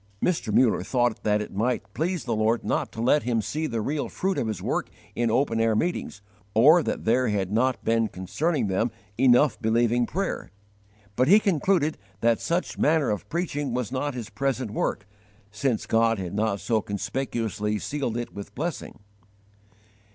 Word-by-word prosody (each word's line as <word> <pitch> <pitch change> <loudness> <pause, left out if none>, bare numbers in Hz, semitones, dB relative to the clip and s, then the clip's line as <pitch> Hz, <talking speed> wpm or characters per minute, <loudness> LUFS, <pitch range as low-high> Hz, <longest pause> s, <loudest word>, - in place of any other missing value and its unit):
Mr. 160 - 0
Muller 115 -3 +3
thought 120 +3 0
that 105 0 +1
it - - -11
might 110 0 -1
please 170 0 -1
the 115 -3 -1
Lord 110 +2 +1
not - - -1
to - - -8
let 145 +5 +4
him 120 -2 0
see 155 +8 -2
the 115 -5 -2
real 145 +6 -2
fruit 190 0 -1
of 115 - -1
his 110 -4 -3
work - - -2 0.2
in 120 0 0
open 115 -1 +1
air 115 -1 +2
meetings, 110 - -2 0.3
or 150 +10 +7
that - - -3
there 125 +3 +3
had 100 -3 -1
not 125 +4 +1
been 115 0 +2
concerning 110 - -1
them 100 +4 0 0.3
enough 130 +2 +4
believing 120 +2 +2
prayer; 195 +2 -3 0.7
but 130 +3 +2
he 200 +6 +7
concluded 180 -4 +1 0.2
that 115 -1 +2
such 170 +2 -2
manner 155 -4 +3
of 105 - -4
preaching 145 -7 -2
was 125 -4 -2
not 135 +1 -2
his 120 -4 -6
present 130 0 -1
work, 95 - -2 0.5
since 120 +1 -1
God 115 0 +2
had 95 -2 -5
not 105 -1 0
so 110 +1 0
conspicuously 105 -1 -2
sealed 130 -1 -3
it 120 - -5
with 100 0 -9
blessing. 155 -6 -5
120 Hz, 175 wpm, -26 LUFS, 110-145 Hz, 0.7 s, or